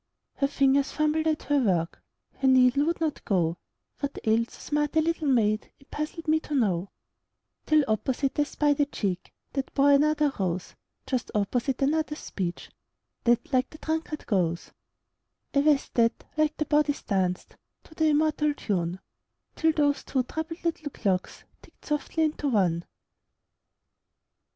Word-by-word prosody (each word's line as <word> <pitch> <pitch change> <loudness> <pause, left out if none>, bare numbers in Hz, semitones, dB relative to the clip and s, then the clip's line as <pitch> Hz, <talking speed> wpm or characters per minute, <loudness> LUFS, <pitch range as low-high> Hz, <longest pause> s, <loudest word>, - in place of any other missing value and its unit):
Her 275 - +2
fingers 275 0 +2
fumbled 305 +1 +1
at 310 -1 0
her 290 -1 +2
work, 175 -9 0 0.4
Her 270 - +1
needle 260 +2 +5
would 335 - 0
not 315 -3 -2
go; 175 -5 0 0.4
What 280 -1 -3
ailed 225 +1 +2
so - - -14
smart 295 +1 -1
a - - +5
little 320 -1 0
maid 215 -5 +2
It 275 - -24
puzzled 310 +2 -5
me 315 +1 +4
to 300 -1 -5
know, 195 -7 +1 0.8
Till 310 -2 +4
opposite 260 +6 -1
I - - +5
spied 290 -1 +1
a 290 - +3
cheek 195 -9 -3 0.2
That 270 -2 -3
bore 280 0 +5
another 295 0 +3
rose; 180 -1 -2 0.3
Just 255 -3 -2
opposite, 240 +6 0
another 305 +2 +1
speech 180 - -5 0.5
That 240 +3 +2
like 255 0 +2
the 310 - -12
drunkard 315 -1 -3
goes; 175 -5 0 0.8
A 280 - +4
vest 290 -1 +2
that, 230 -1 +2
like 310 0 +1
the 305 - 0
bodice, 295 -1 +1
danced 185 -3 -1 0.3
To - - -17
the 315 0 +1
immortal 300 -1 +2
tune, 180 -6 -2 0.5
Till 320 -1 +3
those 290 -2 +1
two 260 -2 0
troubled 320 +5 -6
little 325 -3 -2
clocks 190 -8 -2 0.2
Ticked - - -21
softly 300 +2 -1
into 305 -1 -1
one. 175 -7 +1
280 Hz, 155 wpm, -27 LUFS, 215-305 Hz, 0.8 s, needle